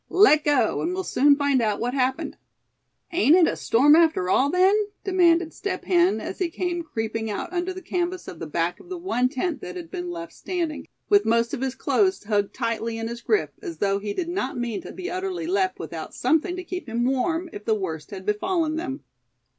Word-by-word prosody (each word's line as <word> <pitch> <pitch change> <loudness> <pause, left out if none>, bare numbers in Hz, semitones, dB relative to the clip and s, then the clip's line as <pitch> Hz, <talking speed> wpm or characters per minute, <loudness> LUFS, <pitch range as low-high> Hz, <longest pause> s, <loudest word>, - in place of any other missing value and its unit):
Let 360 -6 +5
go, 290 -3 +2
and 355 +2 -1
we'll 380 - -2
soon 285 -3 +4
find 285 -3 +2
out 210 -2 0
what 245 +1 -1
happened." 265 -1 -1 0.8
"Ain't 335 -3 +5
it 360 -2 +6
a - - 0
storm 285 +6 +5
after 320 - +3
all 275 +7 +3
then?" 370 +4 +4 0.3
demanded 350 -3 +3
Step 380 -2 -4
Hen, 360 +1 +3
as - - -6
he 365 -3 0
came 350 +1 -2
creeping 225 -7 -3
out 275 - -4
under 355 +1 -1
the 375 0 -8
canvas 355 +1 -2
of 165 - -8
the 165 - -5
back 165 +3 -1
of 360 - -16
the 370 - -4
one 335 -9 0
tent 300 +3 -2
that - - -7
had 345 -2 -8
been 355 -2 -4
left 335 -1 -6
standing, 335 -4 -4 0.2
with 405 0 +5
most 230 +2 +1
of 270 - -3
his 265 -1 -2
clothes 380 - +1
hugged 205 -1 0
tightly 230 -2 -2
in 225 0 -3
his 235 0 -6
grip, 425 - +1
as 345 -5 -6
though 200 -1 +1
he 205 0 -4
did 345 - -2
not 345 -9 -2
mean 240 -3 -2
to - - -9
be 370 0 -6
utterly 370 -2 -3
left 375 +1 0
without - - -7
something 335 +3 +1
to 365 - -5
keep 360 -6 -6
him 235 +2 0
warm, 320 +7 0
if 210 - -8
the 220 - +2
worst 160 -7 -4
had 190 -2 -8
befallen 315 - 0
them. 315 -4 -4
320 Hz, 220 wpm, -24 LUFS, 235-360 Hz, 0.8 s, it